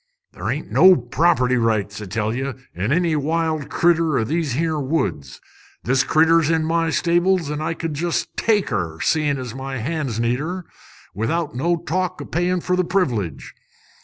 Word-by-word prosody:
"Ther' -, -, -5 dB
ain't -, -, -3 dB
no 185 Hz, 0 st, +7 dB
property 125 Hz, 0 st, +2 dB
rights, 110 Hz, -3 st, 0 dB
I -, -, -5 dB
tell 110 Hz, +3 st, -2 dB
ye, 135 Hz, +2 st, -3 dB, 0.2 s
in 95 Hz, +8 st, -2 dB
any 170 Hz, 0 st, +2 dB
wild 155 Hz, 0 st, -1 dB
critter 165 Hz, -4 st, +2 dB
o' -, -, +1 dB
these 155 Hz, +2 st, -1 dB
here 160 Hz, +2 st, 0 dB
woods. 130 Hz, -, -2 dB, 0.4 s
This 130 Hz, +1 st, +2 dB
critter's 160 Hz, 0 st, +3 dB
in 160 Hz, -1 st, +1 dB
my 165 Hz, 0 st, +1 dB
stables, 175 Hz, 0 st, +1 dB
an' 150 Hz, 0 st, -3 dB
I 160 Hz, +1 st, -2 dB
could 165 Hz, -1 st, -4 dB
jest 165 Hz, +3 st, -2 dB
take 210 Hz, -4 st, +1 dB
her, 85 Hz, -6 st, -3 dB
seein' 150 Hz, -, +1 dB
as 125 Hz, -3 st, -6 dB
my 135 Hz, +1 st, -5 dB
hands 135 Hz, -2 st, -3 dB
needs 120 Hz, +2 st, +1 dB
her, 175 Hz, +4 st, -4 dB, 0.5 s
without 150 Hz, -, -2 dB
no 170 Hz, +7 st, +1 dB
talk 185 Hz, +2 st, -2 dB
o' -, -, -6 dB
payin' 175 Hz, +1 st, 0 dB
fer 180 Hz, -, 0 dB
the 185 Hz, -, +2 dB
privilege. 120 Hz, -, -1 dB
155 Hz, 175 wpm, -21 LUFS, 125-170 Hz, 0.5 s, no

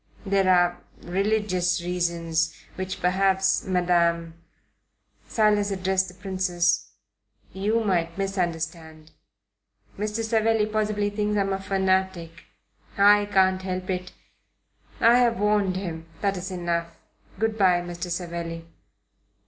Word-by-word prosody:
There 195 Hz, -1 st, +2 dB
are 175 Hz, -1 st, +3 dB, 0.2 s
religious 185 Hz, -1 st, 0 dB
reasons, 170 Hz, -2 st, -1 dB, 0.2 s
which 185 Hz, 0 st, -5 dB
perhaps, 190 Hz, +1 st, +2 dB
Madam" 170 Hz, -2 st, +1 dB, 0.9 s
Silas 210 Hz, -2 st, +2 dB
addressed 190 Hz, -1 st, 0 dB
the 180 Hz, -, -12 dB
Princess 185 Hz, -2 st, 0 dB, 0.6 s
"you 215 Hz, +4 st, 0 dB
might 170 Hz, -4 st, 0 dB
misunderstand. 165 Hz, -4 st, -3 dB, 0.9 s
Mr. 210 Hz, +2 st, -2 dB
Savelli 225 Hz, -1 st, +2 dB
possibly 210 Hz, -1 st, -1 dB
thinks 210 Hz, 0 st, -1 dB
I -, -, +3 dB
am 195 Hz, 0 st, 0 dB
a 195 Hz, -, -2 dB
fanatic. 190 Hz, -3 st, -1 dB, 0.5 s
I 205 Hz, +1 st, +5 dB
can't 190 Hz, -1 st, +3 dB
help 185 Hz, 0 st, -3 dB
it. 180 Hz, 0 st, -4 dB, 0.9 s
I 235 Hz, +2 st, +6 dB
have 235 Hz, -3 st, +2 dB
warned 205 Hz, -2 st, +2 dB
him. 165 Hz, -4 st, -5 dB
That 200 Hz, -1 st, +1 dB
is 185 Hz, +1 st, -5 dB
enough. 170 Hz, -2 st, -3 dB, 0.4 s
Good 220 Hz, +1 st, 0 dB
bye, 185 Hz, -4 st, +3 dB
Mr. 175 Hz, 0 st, -6 dB
Savelli." 170 Hz, -1 st, -4 dB
185 Hz, 115 wpm, -25 LUFS, 175-205 Hz, 0.9 s, I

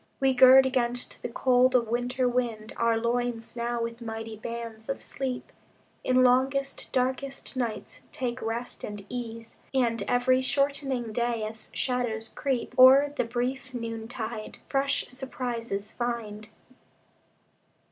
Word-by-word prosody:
We 270 Hz, -1 st, +3 dB
gird 260 Hz, +1 st, +8 dB
against 245 Hz, -2 st, -1 dB
the -, -, -4 dB
cold 255 Hz, +1 st, +3 dB
of 235 Hz, -2 st, +3 dB
winter 245 Hz, +2 st, 0 dB
wind 235 Hz, -3 st, -2 dB
Our 230 Hz, -1 st, +2 dB
loins 235 Hz, 0 st, -1 dB
now 235 Hz, 0 st, -1 dB
with 230 Hz, +1 st, -5 dB
mighty 225 Hz, -1 st, -5 dB
bands 230 Hz, 0 st, -7 dB
of 275 Hz, -, -2 dB
sleep, 260 Hz, -2 st, -4 dB, 0.5 s
In 255 Hz, 0 st, +4 dB
longest, 265 Hz, +2 st, +2 dB
darkest 265 Hz, +2 st, -1 dB
nights 235 Hz, -4 st, -3 dB
take 255 Hz, 0 st, -3 dB
rest 230 Hz, +2 st, -4 dB
and 205 Hz, -1 st, -6 dB
ease, 230 Hz, -2 st, -6 dB, 0.2 s
And 235 Hz, -3 st, +2 dB
every 255 Hz, +1 st, +3 dB
shortening 270 Hz, -3 st, 0 dB
day, 235 Hz, -1 st, 0 dB
as 220 Hz, +1 st, -6 dB
shadows 240 Hz, -3 st, -1 dB
creep 250 Hz, 0 st, -2 dB
O'er 275 Hz, +3 st, +8 dB
the 250 Hz, -, +1 dB
brief 250 Hz, +2 st, -3 dB
noontide, 225 Hz, -1 st, -5 dB
fresh 275 Hz, 0 st, +1 dB
surprises 240 Hz, -5 st, -4 dB
find. 220 Hz, -3 st, -4 dB
245 Hz, 125 wpm, -28 LUFS, 230-255 Hz, 0.5 s, gird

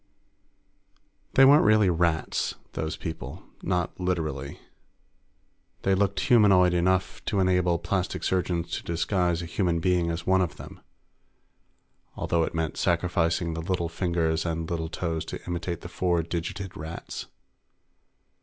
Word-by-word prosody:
They 135 Hz, -, +8 dB
weren't 145 Hz, +3 st, +7 dB
really 105 Hz, -3 st, +5 dB
rats, 85 Hz, -1 st, 0 dB, 0.2 s
those 80 Hz, 0 st, -3 dB
people. 80 Hz, -2 st, -6 dB, 0.2 s
Not 90 Hz, -1 st, -1 dB
literally. 80 Hz, -7 st, -2 dB, 1.2 s
They 95 Hz, -, +3 dB
looked 100 Hz, 0 st, +1 dB
humanoid 95 Hz, -6 st, +5 dB
enough 90 Hz, +2 st, +1 dB
to 100 Hz, -, 0 dB
enable 90 Hz, -2 st, +2 dB
plastic 90 Hz, +2 st, -2 dB
surgeons 85 Hz, -2 st, -1 dB
to -, -, -3 dB
disguise 85 Hz, 0 st, 0 dB
a -, -, -4 dB
human 85 Hz, 0 st, 0 dB
being 90 Hz, -1 st, +1 dB
as 85 Hz, +1 st, -3 dB
one 95 Hz, 0 st, +3 dB
of 90 Hz, -, -1 dB
them, -, -, -11 dB, 1.4 s
although 85 Hz, -, 0 dB
it 80 Hz, -, -2 dB
meant 80 Hz, -2 st, -2 dB
sacrificing 85 Hz, -1 st, +1 dB
the 80 Hz, -, -4 dB
little 85 Hz, 0 st, -1 dB
fingers 85 Hz, -2 st, 0 dB
and 80 Hz, -1 st, -2 dB
little 80 Hz, -1 st, -3 dB
toes 80 Hz, -2 st, -2 dB
to -, -, -7 dB
imitate 85 Hz, -1 st, -3 dB
the -, -, -7 dB
four 85 Hz, -1 st, 0 dB
digited 85 Hz, +3 st, -4 dB
Rats. 80 Hz, +3 st, -7 dB
85 Hz, 135 wpm, -27 LUFS, 85-95 Hz, 1.4 s, They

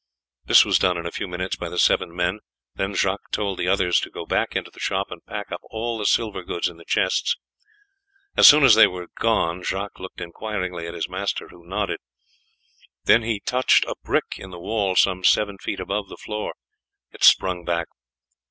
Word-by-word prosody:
This -, -, +7 dB
was -, -, +2 dB
done 90 Hz, -1 st, +2 dB
in 85 Hz, -, -6 dB
a 85 Hz, -, -3 dB
few -, -, -4 dB
minutes 90 Hz, +1 st, -4 dB
by 85 Hz, -, -5 dB
the 90 Hz, -, -7 dB
seven 85 Hz, -, +3 dB
men, 90 Hz, +3 st, -1 dB, 0.3 s
then 95 Hz, +1 st, -3 dB
Jacques 95 Hz, +1 st, -1 dB
told 100 Hz, -3 st, -2 dB
the 90 Hz, -, -1 dB
others 90 Hz, -2 st, +3 dB
to -, -, -5 dB
go -, -, -8 dB
back -, -, -1 dB
into -, -, -3 dB
the -, -, -16 dB
shop 95 Hz, 0 st, -2 dB
and 90 Hz, -1 st, -9 dB
pack 105 Hz, -1 st, -6 dB
up 85 Hz, -, -4 dB
all 115 Hz, +1 st, -3 dB
the 105 Hz, -, 0 dB
silver 110 Hz, -5 st, +1 dB
goods 85 Hz, -1 st, -2 dB
in 85 Hz, -2 st, -9 dB
the 85 Hz, -, -15 dB
chests. 105 Hz, -, +1 dB, 1.0 s
As -, -, +8 dB
soon 150 Hz, 0 st, +8 dB
as 130 Hz, -, +8 dB
they 110 Hz, -, +8 dB
were 90 Hz, -1 st, -7 dB
gone 90 Hz, -6 st, +1 dB
Jacques 100 Hz, +2 st, -4 dB
looked 95 Hz, 0 st, -9 dB
inquiringly 90 Hz, -2 st, -5 dB
at 85 Hz, -, -7 dB
his 85 Hz, -, -3 dB
master, 95 Hz, +2 st, -3 dB
who 85 Hz, -1 st, -17 dB
nodded. 100 Hz, +1 st, -2 dB, 1.0 s
Then 115 Hz, -, +5 dB
he 110 Hz, -2 st, -2 dB
touched 125 Hz, +1 st, +3 dB
a -, -, -3 dB
brick -, -, -1 dB
in 95 Hz, -, -9 dB
the 90 Hz, -, -9 dB
wall 100 Hz, +1 st, -1 dB
some 95 Hz, 0 st, +3 dB
seven 100 Hz, +1 st, +2 dB
feet -, -, -4 dB
above 105 Hz, -2 st, -3 dB
the -, -, -10 dB
floor; 105 Hz, 0 st, -5 dB, 0.6 s
it -, -, -9 dB
sprung 90 Hz, -2 st, +5 dB
back. 85 Hz, -1 st, -1 dB
95 Hz, 205 wpm, -23 LUFS, 90-105 Hz, 1.0 s, As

